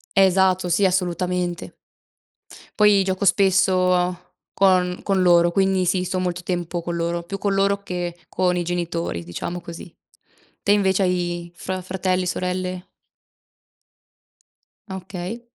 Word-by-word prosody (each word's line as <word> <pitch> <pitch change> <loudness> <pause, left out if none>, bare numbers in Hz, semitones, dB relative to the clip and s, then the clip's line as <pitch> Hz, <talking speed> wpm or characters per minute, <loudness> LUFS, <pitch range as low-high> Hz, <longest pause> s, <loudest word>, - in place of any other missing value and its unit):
Esatto, 190 -1 +3
sì, 175 +4 +2
assolutamente. 180 -1 -1 1.0
Poi 210 -2 +5
gioco 190 +1 -1
spesso 185 -2 +2 0.3
con 180 -2 +2
con 195 -2 +1
loro, 175 -1 +5
quindi 190 0 +2
sì, 180 +1 +1
sto 185 +1 -2
molto 180 -1 -2
tempo 175 -1 -3
con 170 0 -4
loro, 170 0 -2
più 195 +4 -6
con 200 -1 0
loro 200 +1 +1
che 175 -3 -4
con 180 -1 0
i 175 - 0
genitori, 170 - -3
diciamo 130 - -5
così. 170 0 -10 0.7
Te 200 - +3
invece 195 -1 +2
hai 175 -1 -2
fra 185 +2 -4
fratelli, 185 0 -1
sorelle? 180 0 -3 2.0
Okay. 190 +4 -6
180 Hz, 125 wpm, -22 LUFS, 175-190 Hz, 2.0 s, Poi